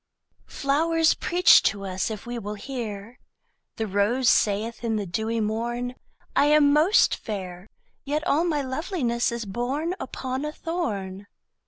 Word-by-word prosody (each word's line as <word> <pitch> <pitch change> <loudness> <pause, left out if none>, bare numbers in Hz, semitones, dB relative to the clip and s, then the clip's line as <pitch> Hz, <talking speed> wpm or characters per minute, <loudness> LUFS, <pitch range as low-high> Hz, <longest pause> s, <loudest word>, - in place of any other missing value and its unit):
Flowers 320 +3 +2
preach 355 +1 +5
to 200 -1 -1
us 190 +1 -2
if 215 -2 -6
we 240 0 -4
will 210 -1 -5
hear: 225 -1 -6 0.6
The 225 - -2
rose 210 +5 +2
saith 215 +3 +1
in 225 -1 0
the 210 -2 -2
dewy 220 +6 -2
morn, 235 +3 -2 0.4
I - - +4
am 295 -1 +5
most 320 +8 +4
fair; 190 -2 -7 0.3
Yet 295 +2 -2
all 305 +4 +2
my 305 -5 0
loveliness 260 -4 -1
is 235 -1 -4
born 260 - -2
Upon 260 +1 -4
a 300 - -3
thorn. 205 - -4
240 Hz, 145 wpm, -25 LUFS, 210-295 Hz, 0.6 s, preach